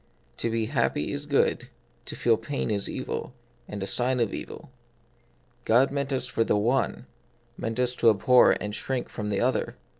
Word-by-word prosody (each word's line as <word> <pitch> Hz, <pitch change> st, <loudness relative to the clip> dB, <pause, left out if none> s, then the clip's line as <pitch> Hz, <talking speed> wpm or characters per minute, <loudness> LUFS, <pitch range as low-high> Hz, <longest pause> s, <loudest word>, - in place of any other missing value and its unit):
To 115 Hz, -, -1 dB
be 115 Hz, -1 st, 0 dB
happy 130 Hz, +4 st, 0 dB
is 145 Hz, 0 st, -5 dB
good: 140 Hz, -2 st, +1 dB, 0.4 s
to -, -, -7 dB
feel 115 Hz, -1 st, +3 dB
pain 115 Hz, +2 st, -3 dB
is 100 Hz, -1 st, -1 dB
evil, 125 Hz, -, -5 dB, 0.3 s
and 105 Hz, -, -6 dB
the 95 Hz, -, -3 dB
sign 125 Hz, +5 st, +1 dB
of 115 Hz, -4 st, 0 dB
evil. -, -, -8 dB, 0.9 s
God 125 Hz, +5 st, +4 dB
meant 140 Hz, 0 st, -2 dB
us 130 Hz, -2 st, -1 dB
for 115 Hz, -2 st, 0 dB
the 105 Hz, -, +1 dB
one, 120 Hz, +6 st, 0 dB, 0.5 s
meant 115 Hz, +2 st, -4 dB
us 125 Hz, 0 st, +1 dB
to 115 Hz, -, +5 dB
abhor, 120 Hz, +4 st, +5 dB
and 105 Hz, 0 st, -4 dB
shrink 130 Hz, +3 st, -2 dB
from 105 Hz, -1 st, -5 dB
the 100 Hz, -1 st, 0 dB
other. 130 Hz, +2 st, 0 dB
120 Hz, 180 wpm, -26 LUFS, 110-130 Hz, 0.9 s, to